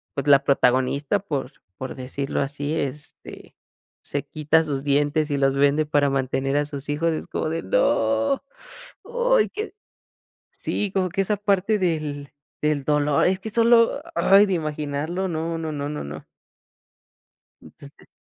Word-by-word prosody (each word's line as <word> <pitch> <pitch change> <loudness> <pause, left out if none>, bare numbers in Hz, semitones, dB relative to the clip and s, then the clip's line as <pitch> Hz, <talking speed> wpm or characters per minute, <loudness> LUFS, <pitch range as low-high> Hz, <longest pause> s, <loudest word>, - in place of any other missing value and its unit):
pues, 140 - -3
la 140 -1 +6
protagonista, 140 +6 +2
por 145 -8 -4 0.2
por 130 - -5
decirlo 135 +2 -3
así, 145 +2 -3
este, 145 0 -6 0.5
se - - -4
quita 155 +1 +2
sus 140 -3 -3
dientes 145 +2 +1
y 140 - +1
los 135 0 +2
vende 145 +2 +3
para 145 -1 +2
mantener 135 +1 0
a 145 - +1
sus 145 0 -8
hijos, 165 +3 +1
es 155 - -4
como - - -2
de: 165 +1 -2
"¡no!". 280 - +1 0.6
Ay, 485 -1 +2
que 430 0 -6 0.8
sí, 205 -2 -3
como 185 -2 +1
que 195 - -2
esa 210 +2 0
parte 205 +1 +1
del 155 -5 -2 0.3
del 150 -2 0
dolor, 150 -1 +2
es 190 0 0
que 220 - -6
solo, 235 +5 +4
ay, 200 +2 +6
de 190 - 0
imaginarlo, 155 +3 -2
no, 165 0 -2
no, 160 -1 -4
no, 145 0 -3
no, 150 - -4
no. 75 +2 -8 1.4
Entonces 140 +1 -16
150 Hz, 150 wpm, -23 LUFS, 140-190 Hz, 1.4 s, la